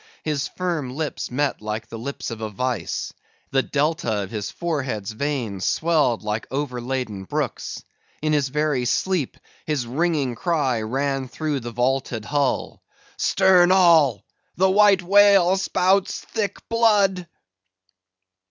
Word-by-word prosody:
His 150 -3 -1
firm 165 -8 -3
lips 155 0 -3
met 140 0 -1
like 110 +1 -4
the 115 - -7
lips 140 +1 -5
of 115 -1 -7
a 110 - -3
vice; 115 -3 -3 0.4
the 135 - +3
Delta 140 -8 -1
of 95 - -9
his 105 -3 -4
forehead's 130 - -3
veins 115 -6 -3
swelled 155 -9 +1
like 105 +1 -3
overladen 125 -6 -3
brooks; - - -4 0.4
in 155 0 0
his 145 -2 +2
very 150 -3 0
sleep, 170 +3 0 0.3
his 150 -5 -1
ringing 145 0 0
cry 135 -5 0
ran 135 +4 -2
through 145 +2 -3
the 120 -1 -6
vaulted 125 -2 -1
hull, 145 +1 -1 0.4
"Stern 185 -2 +4
all! 160 - +4 0.3
the 190 +1 +3
White 200 -2 +5
Whale 195 -1 +5
spouts 190 0 +1
thick 205 -3 -4
blood!" 205 -6 +2
140 Hz, 130 wpm, -23 LUFS, 120-175 Hz, 0.4 s, White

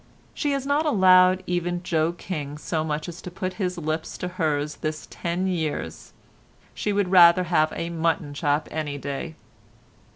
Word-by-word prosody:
She 290 -1 -1
has 275 -1 -2
not 290 +3 +1
allowed 185 -6 +5
even 175 0 -2
Joe 165 -1 +1
King 150 -5 -5
so 155 +1 -2
much 150 -1 -3
as 175 -1 -8
to - - -7
put 185 +1 -4
his 180 -1 -1
lips 155 -1 -3
to 180 - -4
hers 150 -4 -1
this 155 0 -4
ten 175 +2 -2
years. 165 -5 -3 0.6
She 210 - -2
would 200 -2 0
rather 175 -1 +7
have 155 -3 +2
a 170 0 -3
mutton 160 -3 -1
chop 145 +1 0
any 150 -2 -3
day. 140 +3 -5
170 Hz, 165 wpm, -24 LUFS, 155-185 Hz, 0.6 s, rather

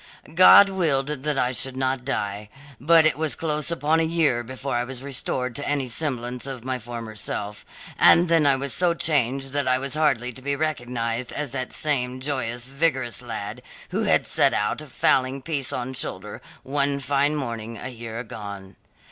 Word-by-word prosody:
"God 185 +3 +8
willed 160 -8 0
that 150 0 -2
I 125 -1 +1
should 130 0 -1
not 130 -1 -1
die, 105 -5 -3 0.3
but 160 +4 +5
it 155 -1 +2
was 155 -2 0
close 150 -2 -1
upon 160 -1 +1
a - - +2
year 160 -7 +1
before 130 +2 -5
I 120 - +1
was 130 +1 -7
restored 125 -2 -3
to 145 - -2
any 140 -3 0
semblance 125 -1 -2
of 130 -4 -7
my 130 0 -3
former 115 -1 -8
self, 105 0 -4 0.4
and 175 +2 +6
then 165 -3 +3
I 140 - +5
was 135 -1 -3
so 175 +4 +1
changed 135 -3 +1
that 145 -2 +1
I 130 0 +3
was 135 +1 -4
hardly 135 -6 +1
to 130 - -10
be 140 +1 -1
recognized 125 -5 -2
as 145 -3 -4
that 130 -2 -3
same 130 -4 +2
joyous, 125 -3 -2
vigorous 135 -3 -1
lad, 110 -4 -6 0.3
who - - -1
had - - +2
set - - +3
out, 105 +8 -1
fowling 135 -2 +1
piece 140 -2 -2
on 130 +1 -4
shoulder, 105 -4 -5 0.2
one 140 0 0
fine 140 +2 +1
morning 115 -5 -5
a 130 - -6
year 115 -2 -8
agone. 100 -4 -8
130 Hz, 180 wpm, -24 LUFS, 120-145 Hz, 0.4 s, God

